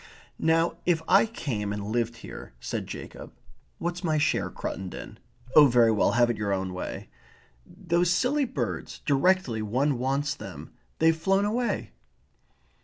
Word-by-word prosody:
"Now 165 +1 +2
if 165 -2 +2
I - - +5
came 110 - -3
and 105 0 -4
lived 120 0 0
here - - -10
" - - -31
said - - -3
Jacob. - - -9 0.4
"What's 175 +2 -3
my 160 -3 +1
share, 150 - +1
Cruttendon? 95 -2 -6 0.4
Oh, 150 -2 +9
very 120 -3 +5
well. 105 - +2
Have 120 0 +4
it 115 - -5
your 105 -1 -2
own 95 -1 -1
way. 90 - -6 0.6
Those 175 -2 0
silly 255 +10 +2
birds, 115 - -4
directly 140 -5 +2
one 125 +5 0
wants 140 +3 0
them 80 - -10 0.2
they've 160 0 +4
flown 195 +5 +2
away." 225 - -1
140 Hz, 150 wpm, -27 LUFS, 110-175 Hz, 0.6 s, Oh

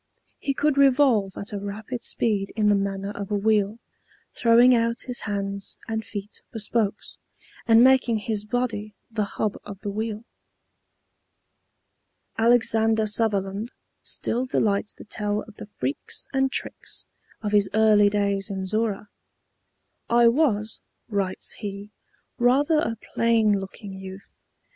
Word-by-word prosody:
He 275 - -2
could 290 -1 +1
revolve 255 -8 +4
at 200 +1 -5
a 205 - -2
rapid 215 +5 -6
speed 205 -4 0
in 210 -2 +3
the - - +5
manner 195 0 -1
of 200 -1 -6
a 210 - 0
wheel, 210 0 +2 0.6
throwing 240 +2 +5
out 230 0 +1
his 250 -2 -4
hands 200 -1 -3
and 220 0 -2
feet 205 0 -7
for - - -6
spokes, 215 -1 -1 0.5
and 230 +1 +7
making 255 -3 +4
his 210 -1 -2
body 215 -2 -2 0.2
the 215 -2 0
hub 210 -2 -1
of 200 -2 -9
the 205 - -3
wheel. 215 +1 -3 2.1
Alexander 225 -1 +3
Sutherland 210 0 -1 0.3
still 250 +3 -2
delights 205 -4 0
to - - -11
tell 210 0 -2
of 220 -1 -15
the - - -9
freaks 130 +3 -2
and 270 0 +2
tricks - - -5 0.4
of 210 - -1
his 205 -2 +3
early 215 -2 +5
days 200 -1 0
in 190 -1 -3
Zorra. 215 0 -1 1.0
"I 235 0 +6
was," 230 -6 +1 0.3
writes 195 -3 -1
he, 205 -1 -6 0.5
"rather 280 +6 +4
a 230 -6 -1 0.2
plain 225 -2 +3
looking 195 +1 -8
youth. 190 0 -10
215 Hz, 135 wpm, -25 LUFS, 200-230 Hz, 2.1 s, and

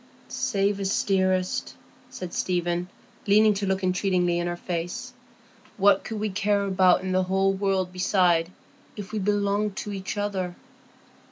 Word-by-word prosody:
"Say 200 0 0
'yes,' 195 -1 -1
dearest," 185 -2 0 0.3
said 180 -2 -7
Stephen, 175 0 -1 0.4
leaning 210 +1 +5
to 200 0 -3
look 190 0 -1
entreatingly 180 -2 +1
in 175 - -1
her 175 0 -3
face. 175 0 -4 0.6
"What 200 -1 +4
could 220 -2 -5
we 215 -1 -2
care 200 +1 +1
about 185 -1 +3
in 190 - -2
the 185 0 +2
whole 195 +1 +2
world 190 -2 -1
beside, 180 -2 +2 0.4
if 205 -1 -8
we 220 - -2
belonged 205 0 0
to 205 - -5
each 190 +1 -5
other?" 190 -3 -2
190 Hz, 150 wpm, -25 LUFS, 180-200 Hz, 0.6 s, leaning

